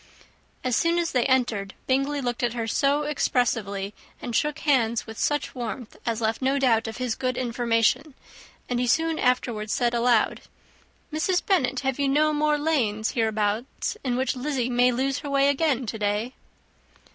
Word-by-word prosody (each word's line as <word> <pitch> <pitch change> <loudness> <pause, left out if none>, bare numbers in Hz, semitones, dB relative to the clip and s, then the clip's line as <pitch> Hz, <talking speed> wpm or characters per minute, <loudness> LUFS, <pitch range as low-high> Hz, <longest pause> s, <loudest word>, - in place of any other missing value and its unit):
As 255 -2 +1
soon 335 +1 +2
as 340 -1 0
they 250 0 +2
entered, 235 -7 0
Bingley 275 +2 0
looked 245 -2 -2
at 240 -2 0
her 235 -2 -2
so 280 +6 +1
expressively, 225 -8 -1 0.3
and 240 - -5
shook 300 -1 +1
hands 235 -6 +1
with 220 -1 -9
such 295 0 0
warmth, 240 -1 -6
as 230 0 -1
left 220 +2 0
no 265 +2 +2
doubt 230 -5 +2
of 225 - -6
his 250 -2 -1
good 255 +2 -2
information; 240 +3 +1 0.5
and 245 -1 -1
he 250 - 0
soon 325 +5 +1
afterwards 235 -4 0
said 240 -1 +1
aloud, 235 -1 +2 0.7
"Mrs. 355 +4 0
Bennet, 265 -10 +1
have 265 0 -1
you 280 - +2
no 305 +2 +3
more 300 0 +2
lanes 240 -9 0
hereabouts 220 - -1
in 250 -3 0
which 260 0 0
Lizzy 255 -2 -2
may 245 +1 +4
lose 270 +3 -1
her 285 - -6
way 275 0 +3
again 285 -3 +1
to 220 0 -5
day?" 210 +4 -1
250 Hz, 170 wpm, -25 LUFS, 230-280 Hz, 0.7 s, may